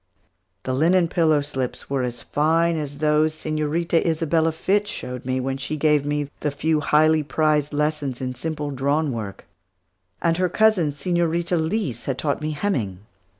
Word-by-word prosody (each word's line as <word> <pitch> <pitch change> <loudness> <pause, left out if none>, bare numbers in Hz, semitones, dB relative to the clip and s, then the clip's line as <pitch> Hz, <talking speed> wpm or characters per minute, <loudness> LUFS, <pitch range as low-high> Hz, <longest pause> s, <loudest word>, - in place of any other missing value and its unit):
The 130 - -2
linen 170 +5 +3
pillow 155 -4 +3
slips 135 -3 -4
were 135 -1 -1
as 120 -1 -4
fine 165 +3 +2
as 145 -2 -4
those 155 +1 +2
Señorita 155 +2 0
Isabella 165 0 +1
Fitch 200 +6 0
showed 125 - -6
me, 130 0 0
when 135 +1 -2
she 140 +3 -4
gave 150 -1 +2
me 145 -1 -1
the 150 - -1
few 155 +2 0
highly 155 +1 +3
prized 150 0 +1
lessons 150 -3 -1
in 130 -1 -3
simple 150 +2 -4
drawn 140 +3 0
work; 110 -5 -6 0.7
and 165 -1 +1
her 180 0 +1
cousin, 200 -6 +3
Señorita 170 +2 0
Leese, 160 - -1
had 135 -2 -2
taught 145 +1 -1
me 155 - -2
hemming. 130 - -2
150 Hz, 160 wpm, -23 LUFS, 140-165 Hz, 0.7 s, linen